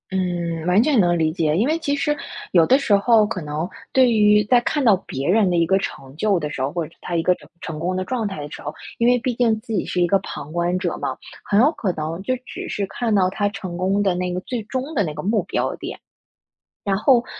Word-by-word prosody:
嗯， 175 -3 -2
完 185 +5 +4
全 285 -4 +3
能 175 -3 +3
理 160 -1 +1
解。 155 -3 0
因 205 +7 +2
为 320 +2 +1
其 285 -3 0
实， 295 +1 0 0.4
有 170 -3 +5
的 260 - +5
时 275 -7 +1
候 215 +1 +4
可 200 -3 -4
能 150 +2 -3 0.3
对 260 -2 +5
于 210 -1 +5
在 240 +4 +4
看 290 +4 -1
到 225 -4 +6
别 135 +1 -3
人 200 0 +4
的 175 - +1
一 170 -1 +3
个 190 +3 +3
成 135 -8 -6
就 205 +2 +2
的 150 -3 -3
时 135 - -5
候， 135 - 0
或 170 -2 -2
者 165 - -15
他 175 - -4
一 165 - +1
个 180 - +4
成 - - -18
成 155 -1 -6
功 180 +3 -1
的 185 - -1
状 225 +2 -2
态 195 -7 -5
的 145 0 -7
时 - - -8
候， 150 - -5 0.2
因 235 - +2
为 245 0 +5
毕 250 +1 -1
竟 230 -2 +2
自 230 - -10
己 195 - 0
是 180 - -1
一 175 - +4
个 195 +3 +3
旁 150 -4 -8
观 175 +2 0
者 185 - -2
嘛， - - -3 0.3
很 205 - +3
有 285 +5 +5
可 205 - -2
能 160 +3 -4
就 255 +5 0
只 - - -7
是 200 - -2
看 225 +2 -1
到 185 -2 +3
他 205 +2 0
成 195 -4 -6
功 195 +3 +1
的 190 -2 +2
那 180 0 -2
个 180 - -1
最 245 +4 -4
终 260 +7 -4
的 245 - +1
那 155 - -4
个 150 0 -6
目 210 +2 +1
标 - - -1
点。 - - -6 0.9
然 195 -1 +1
后 240 +3 +4
195 Hz, 285 characters per minute, -22 LUFS, 170-230 Hz, 0.9 s, 到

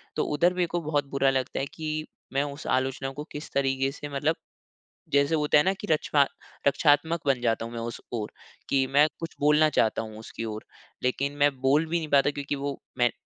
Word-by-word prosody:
तो - - +1
उधर 175 +4 +3
मेरे 180 -1 +1
को 175 - +1
बहुत 150 -2 0
बुरा 135 0 +3
लगता 130 -1 -1
है 135 - 0
कि 155 -1 -3 0.3
मैं 135 +1 +2
उस 145 0 -6
आलोचना 135 +1 -2
को 145 +2 -6
किस 150 - -7
तरीके 135 0 +1
से 145 +1 -7
मतलब 150 +4 +1 0.8
जैसे 140 +3 +4
होता 150 -1 +3
है - - +4
न - - -1
कि 205 - -6
रचना 150 -2 +3 0.4
रक्षात्मक 145 +3 +3
बन 135 -3 +2
जाता 115 -1 +1
हूँ 115 - -8
मैं 115 - -4
उस 115 0 -5
ओर, 110 -3 -3 0.4
कि 135 -1 +3
मैं 145 +3 +5
कुछ 165 -1 -6
बोलना 150 +1 +5
चाहता 110 -6 +2
हूँ 110 -1 -8
उसकी 115 +1 -7
ओर 110 -1 -5 0.4
लेकिन 140 +3 0
मैं 145 0 +4
बोल 140 +4 +3
भी 170 +2 0
नहीं 155 -2 -5
पाता 140 -1 +5
क्योंकि 145 0 -3
वो 140 0 -4 0.2
मैं 120 -1 +3
140 Hz, 215 wpm, -27 LUFS, 135-150 Hz, 0.8 s, मैं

